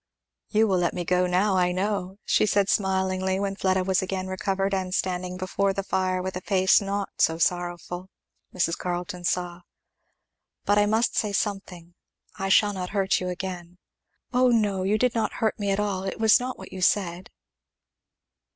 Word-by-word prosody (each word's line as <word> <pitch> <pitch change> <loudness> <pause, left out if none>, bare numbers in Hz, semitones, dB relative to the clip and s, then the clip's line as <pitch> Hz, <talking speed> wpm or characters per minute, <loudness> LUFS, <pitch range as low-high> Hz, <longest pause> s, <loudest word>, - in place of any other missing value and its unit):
"You 220 +1 +3
will 190 -3 +2
let 175 -1 0
me 175 -1 -3
go 180 +1 +2
now, 190 +3 +2
I 180 -1 +2
know," 190 0 -2
she 215 - +3
said 200 -1 +2
smilingly, 190 -1 0
when 195 -1 -2
Fleda 190 -1 +1
was 190 0 +1
again 190 0 -3
recovered 195 +1 -1
and 185 -1 -1
standing 180 -1 -2
before 195 +1 0
the 195 - -3
fire 185 -1 -1
with 190 0 -4
a 185 - -4
face 190 0 +3
not 200 0 -2
so 160 - +3
sorrowful, 175 +1 -2 0.4
Mrs. 170 -2 0
Carleton 175 0 -4
saw. 175 0 -2 1.0
"But 205 0 +3
I 205 - +3
must 220 +3 +1
say 210 - 0
something 190 -4 -3 0.4
I 195 0 -3
shall 205 +1 +4
not 180 -2 -4
hurt 195 -1 +1
you 185 - -3
again." 180 -1 -6 0.6
"Oh 250 +1 +4
no, 210 -5 +2
you 200 +3 +1
did 250 +2 +1
not 225 - -1
hurt 220 -2 -1
me 200 -1 -1
at 195 +1 +1
all 200 -3 -1
it 195 +2 -5
was 220 +2 +5
not 255 +1 -4
what - - -11
you 190 - -6
said." 180 -1 +1
190 Hz, 180 wpm, -25 LUFS, 180-200 Hz, 1.0 s, was